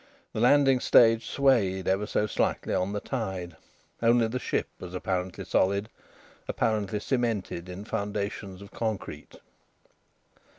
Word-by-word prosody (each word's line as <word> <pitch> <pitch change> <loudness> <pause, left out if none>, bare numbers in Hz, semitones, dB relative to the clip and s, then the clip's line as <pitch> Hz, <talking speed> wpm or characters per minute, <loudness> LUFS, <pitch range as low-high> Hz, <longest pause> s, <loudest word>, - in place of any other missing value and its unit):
The - - -3
landing 135 +2 +5
stage 115 -2 +5
swayed 110 -9 +2
ever 95 +2 +1
so 105 - +1
slightly 105 - -1
on 90 +2 0
the 105 - -2
tide. 95 -9 -4 0.5
Only 115 0 +4
the 125 +3 -3
ship - - -1
was 90 0 -8
apparently 90 0 -3
solid, 100 +3 +1 0.6
apparently 105 -2 0
cemented 110 -8 -2
in 95 +3 -7
foundations 100 -2 -4
of 100 - -13
concrete. 110 -3 -4
105 Hz, 125 wpm, -28 LUFS, 95-115 Hz, 0.6 s, landing